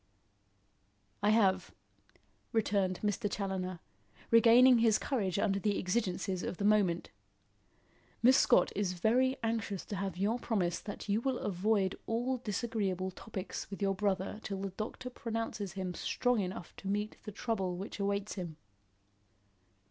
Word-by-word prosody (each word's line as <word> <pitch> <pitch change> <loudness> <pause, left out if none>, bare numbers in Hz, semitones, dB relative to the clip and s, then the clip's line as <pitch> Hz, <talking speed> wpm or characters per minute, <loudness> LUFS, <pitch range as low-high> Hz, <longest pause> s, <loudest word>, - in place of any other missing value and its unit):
"I 205 - +3
have," 195 -4 +3 0.8
returned 200 -5 +1
Mr. 205 0 0
Challoner, 190 -3 -3 0.5
regaining 235 +2 +7
his 225 -2 +4
courage 200 -10 -1
under 195 0 +1
the 205 0 0
exigencies 185 -2 -1
of 180 - -4
the 200 - -1
moment. 200 -5 +2 1.1
"Miss 255 +2 +7
Scott 245 - +5
is 195 -2 0
very 250 +8 +2
anxious 225 -4 -2
to 205 - -5
have 190 -2 -3
your 210 +6 +1
promise 190 -8 0
that 205 0 -7
you 210 +2 +1
will 260 0 0
avoid 195 0 0
all 245 +3 0
disagreeable 205 -5 -2
topics 195 0 -6
with 195 - -7
your 195 -1 +1
brother 195 +1 -1
till 195 -3 -4
the 195 - -2
doctor 215 +6 -6
pronounces 225 -5 -4
him 185 -2 -3
strong 245 +6 0
enough 185 -2 -5
to 195 - -8
meet 210 +2 -1
the 210 - -6
trouble 195 -5 -2
which 195 +3 -6
awaits 200 +1 -1
him." 170 -5 -6
205 Hz, 140 wpm, -33 LUFS, 190-225 Hz, 1.1 s, regaining